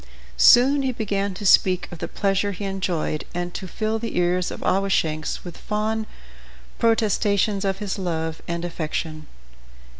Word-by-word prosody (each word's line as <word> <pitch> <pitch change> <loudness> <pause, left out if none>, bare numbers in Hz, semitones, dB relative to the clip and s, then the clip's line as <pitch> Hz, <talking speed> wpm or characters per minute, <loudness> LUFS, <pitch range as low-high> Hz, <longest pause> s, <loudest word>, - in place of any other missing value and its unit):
Soon 270 +3 +6
he 265 -1 0
began 200 -4 -2
to 205 - -7
speak 185 -1 +4
of 175 - -8
the - - -3
pleasure 200 0 0
he 200 +2 -5
enjoyed, 185 -5 -2
and 175 0 -3
to 190 - -5
fill 220 +4 -2
the 230 -4 -4
ears 180 0 +1
of - - -7
Awashanks 165 -5 0
with 175 -2 -8
fond 215 +1 -2 0.7
protestations 210 -3 +2
of 195 -1 0
his 205 -1 -4
love 160 -3 -3
and 170 0 -3
affection. 155 -2 -4
195 Hz, 150 wpm, -23 LUFS, 175-210 Hz, 0.7 s, Soon